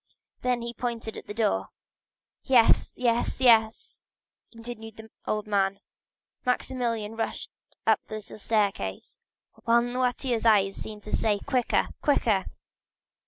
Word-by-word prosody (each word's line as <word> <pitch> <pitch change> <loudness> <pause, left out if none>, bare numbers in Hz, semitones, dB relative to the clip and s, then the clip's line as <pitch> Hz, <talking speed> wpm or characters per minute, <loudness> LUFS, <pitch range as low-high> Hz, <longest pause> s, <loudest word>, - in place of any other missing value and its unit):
Then 250 -1 0
he 235 0 -4
pointed 235 -2 -4
to - - -7
the - - -10
door. 95 - +1 0.7
"Yes, 245 -4 +4
yes, 240 -1 0
yes!" 225 -3 +3 0.5
continued 230 -1 -9
the 220 0 -12 0.2
old 215 0 -1
man. 195 -2 +1 0.7
50089m - - -40
Maximilian 235 -4 -1
rushed 225 - -3 0.3
up - - +4
the 215 - -6
little 215 0 -9
staircase, 200 - -1 0.5
while 235 +1 +4
Noirtier's 245 -1 -1
eyes 200 -4 +4
seemed 210 -1 -8
to 210 - -9
say,—"Quicker, 235 +4 +1
quicker!" 220 -9 +2
225 Hz, 120 wpm, -27 LUFS, 210-240 Hz, 0.7 s, Yes